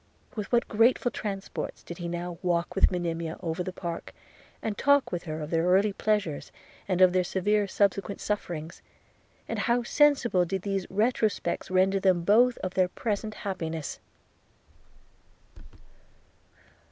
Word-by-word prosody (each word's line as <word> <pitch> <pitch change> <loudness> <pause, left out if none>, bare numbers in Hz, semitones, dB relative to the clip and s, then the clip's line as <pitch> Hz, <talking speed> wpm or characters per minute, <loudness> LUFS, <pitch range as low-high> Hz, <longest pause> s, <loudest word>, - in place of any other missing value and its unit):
With 210 -3 -5
what 240 -1 +3
grateful 235 +3 +3
transports 195 -2 -5
did 170 - -9
he 175 - -4
now 175 0 -4
walk 175 -2 0
with - - +4
Monimia 170 -2 -3
over 165 +1 -3
the 185 - -3
park, 170 -2 -6 0.4
and 220 -2 -3
talk 285 +4 +3
with 175 0 -3
her 155 -1 -4
of 150 - -6
their 165 0 +2
early 195 +3 +4
pleasures 205 -8 -1 0.4
and 185 -1 0
of 185 -1 +7
their 185 0 +3
severe 205 +3 +1
subsequent 200 0 0
sufferings! 170 -6 -4 0.7
and - - -3
how 240 0 +1
sensible 255 -8 +3
did 190 +2 -3
these 195 -2 -2
retrospects 210 -4 0
render 190 +1 +3
them 185 -3 +2
both 235 +6 +4
of 185 -1 -2
their 185 -1 +3
present 215 +2 -3
happiness! 165 -6 -4
190 Hz, 140 wpm, -28 LUFS, 175-210 Hz, 0.7 s, of